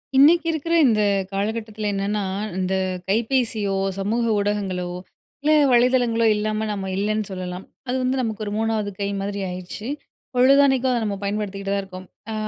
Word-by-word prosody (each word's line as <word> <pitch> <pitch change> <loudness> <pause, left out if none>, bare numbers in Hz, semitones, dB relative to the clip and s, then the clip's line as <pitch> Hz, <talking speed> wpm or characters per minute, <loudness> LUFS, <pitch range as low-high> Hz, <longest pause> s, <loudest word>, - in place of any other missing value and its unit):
இன்னைக்கு 320 +6 +6
இருக்குற 325 +1 -2
இந்த 215 -2 +3 0.3
காலகட்டத்துல 215 +1 -3
என்னன்னா, 200 +1 -1 0.4
இந்த 185 0 -1 0.4
கைபேசியோ, 225 -2 +1 0.2
சமூக 215 +5 0 0.2
ஊடகங்களோ, 200 -3 -1 0.6
இல்ல 300 +2 +2 0.2
வலைதளங்களோ 240 -2 +3
இல்லாம 215 +1 -1
நம்ம 195 -2 -3
இல்லன்னு 215 +2 0
சொல்லலாம். 185 0 -5 0.2
அது 250 - -1
வந்து 260 +1 0
நமக்கு 220 -2 -3
ஒரு 205 - -4
3வது 220 -2 0
கை 200 0 -1
மாதிரி 200 0 -3
ஆயிருச்சு. 185 +4 -7 0.5
பொழுதன்னைக்கும் 265 0 +5
அத 240 -2 +1
நம்ம 200 -1 -2
பயன்படுத்திட்டு 200 -1 -3
தான் 200 - 0
இருக்கோம். 185 -1 -10 0.2
அ - - -3
215 Hz, 145 wpm, -23 LUFS, 200-240 Hz, 0.6 s, இன்னைக்கு